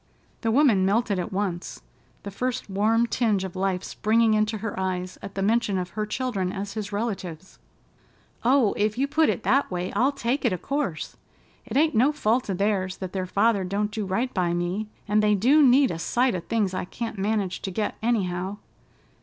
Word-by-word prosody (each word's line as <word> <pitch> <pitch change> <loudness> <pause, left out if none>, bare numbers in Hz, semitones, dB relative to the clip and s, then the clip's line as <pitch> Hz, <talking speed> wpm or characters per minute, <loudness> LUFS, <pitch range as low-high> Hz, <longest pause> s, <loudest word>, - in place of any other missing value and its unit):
The 225 - 0
woman 230 -6 +4
melted 200 0 +1
at 175 - -4
once, 190 -3 -3 0.4
the 200 - -6
first 250 +1 -3
warm 220 +4 +2
tinge 220 -5 +1
of 190 -1 -6
life 190 -1 -1
springing 220 +1 +2
into 215 +1 +1
her 215 +1 -4
eyes 185 -1 -3
at 200 - -8
the 195 - -1
mention 215 -1 +2
of 180 0 -3
her 215 0 -3
children 210 -6 -2
as 200 +1 -5
his 210 -2 -5
relatives. 190 -5 -4 0.8
"Oh, 250 -3 +4
if 210 +1 0
you 275 +2 +1
put 310 +2 +3
it - - -1
that 275 +2 +2
way, 180 0 -3
I'll 265 +3 +3
take 260 +1 -2
it 240 -7 +2
o' - - -1
course. 200 - -3 0.5
It 245 +1 -2
ain't 310 +2 +3
no 250 +7 +4
fault 245 -5 0
of 190 - -1
theirs 195 -2 0
that 185 -2 -6
their 185 -1 -2
father 205 +1 +2
don't 205 +3 -1
do 215 0 -3
right 230 +7 -1
by 175 -2 0
me, 180 +5 -2 0.2
and 210 +1 +3
they 210 0 +3
do 260 +10 +4
need 270 -1 +5
a 165 - -4
sight 245 +7 +1
of 180 -2 -4
things 210 -5 0
I 185 - -2
can't 225 +2 -5
manage 200 -2 -1
to - - -3
get 205 +3 -2
anyhow. 195 -4 -1
210 Hz, 200 wpm, -25 LUFS, 190-235 Hz, 0.8 s, need